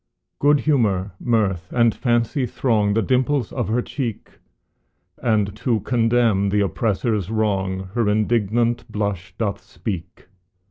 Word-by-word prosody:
Good 145 0 +4
humor, 105 -10 +1
mirth, 100 -7 0
and 115 -2 +3
fancy 120 +2 0
throng 105 -4 +1
The 115 - +2
dimples 130 -1 +1
of 120 -6 -2
her 120 +3 0
cheek, 120 -7 -5 0.9
And 105 -4 +1
to 115 -2 0
condemn 115 -4 +2
the 105 +1 +2
oppressor's 105 -1 0
wrong 95 -4 -1
Her 115 -3 +1
indignant 115 +2 +1
blush 100 -4 -3
doth 100 -3 -2
speak. 90 -5 -7
110 Hz, 125 wpm, -22 LUFS, 100-120 Hz, 0.9 s, Good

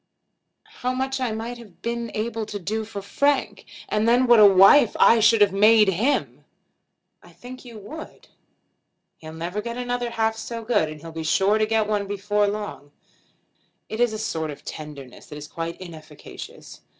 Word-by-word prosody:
How 250 0 -1
much 265 +1 -2
I 250 -3 -1
might 230 +2 -5
have 210 -7 -16
been 235 0 -3
able 220 0 -3
to 205 - -5
do 215 +3 -3
for 205 -2 -8
Frank! 280 +6 0 0.2
And 215 +1 0
then 245 +2 +4
what 240 -2 +6
a 210 - +9
wife 195 +6 +6
I 230 - +6
should 225 0 +4
have 200 -2 +4
made 210 +1 +5
him!" 220 +10 -1 0.8
"I - - -18
think 255 +1 -12
you 235 -3 -11
would." 300 +11 -11 0.9
"He'll 155 0 -10
never 175 +5 -4
get 235 +2 -6
another 245 -1 -2
half 225 -1 0
so 230 +1 -6
good; 210 -9 +1
and 155 -1 -10
he'll 165 0 -9
be 160 0 -6
sure 195 +6 +2
to 215 - +1
get 220 -1 +1
one 205 -2 -1
before 205 +1 0
long. 200 -9 -5 1.0
It 220 - -5
is 240 -2 +3
a 215 - -4
sort 160 -7 -3
of 145 - -10
tenderness 145 -4 -9
that 150 - -9
is 150 0 -9
quite 165 +1 -6
inefficacious. 160 -4 -11
215 Hz, 180 wpm, -23 LUFS, 185-235 Hz, 1.0 s, a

